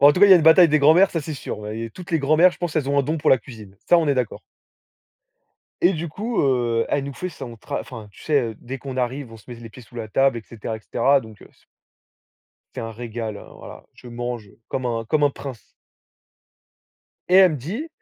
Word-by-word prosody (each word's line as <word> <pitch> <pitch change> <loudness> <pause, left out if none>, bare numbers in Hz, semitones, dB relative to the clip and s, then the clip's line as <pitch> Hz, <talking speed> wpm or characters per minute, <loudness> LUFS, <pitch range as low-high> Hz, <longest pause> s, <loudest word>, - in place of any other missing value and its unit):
En 145 +1 +8
tout 180 - -2
cas, 205 - +9
il - - +4
y - - +11
a - - +10
une 165 - +1
bataille 165 +2 +7
des 155 0 +3
grands-mères 160 +7 +5
ça 165 - -2
c'est 155 +1 -6
sûr. 130 - -6
Ouais, 105 +1 -6
il - - -4
y - - -3
a - - -12
toutes 180 +8 -11
les 165 - +2
grands-mères 155 +5 +4
je - - -13
pense 175 -3 -3
elles 145 -3 0
ont 140 - +2
un - - +3
don 155 +4 -2
pour 150 - +1
la 130 - +6
cuisine. 105 -4 -13
Ça, 175 - +7
on 160 -3 0
est 140 - +3
d'accord 125 -4 -3 1.4
et 180 +3 +5
du 165 +1 -4
coup, 215 +9 -2
heu, 120 -4 +1
elle 140 - 0
nous 140 -1 -7
fait 185 - -5
son, 120 -7 -9
tra 140 +6 -5
enfin 115 -5 -10
tu - - -18
sais, 150 -2 +2
heu, 115 -3 -4
dès 130 +2 -7
qu'on 135 -1 -7
arrive, 125 0 -3
on - - -10
se 110 - -20
met 120 - -7
les 115 -1 -11
pieds 125 - -13
sous 120 - -21
la 115 -2 -5
table 135 +3 +2
et 115 - -10
cetera 110 0 -7
et - - -13
cetera. 135 +6 +2
Donc 110 -3 -13
c - - -20 1.1
c'est - - -5
un 115 0 -6
régal, 115 -2 -6 0.2
voilà, - - -12
je - - -16
mange 120 -2 -5 0.2
comme 130 -1 -3
un 115 -1 -2
comme 150 +6 +1
un 145 - +3
prince 135 -4 -9 1.6
et 180 - +2
elle 190 -3 +7
me - - -3
dit: 200 - -5
135 Hz, 260 wpm, -22 LUFS, 115-155 Hz, 1.6 s, y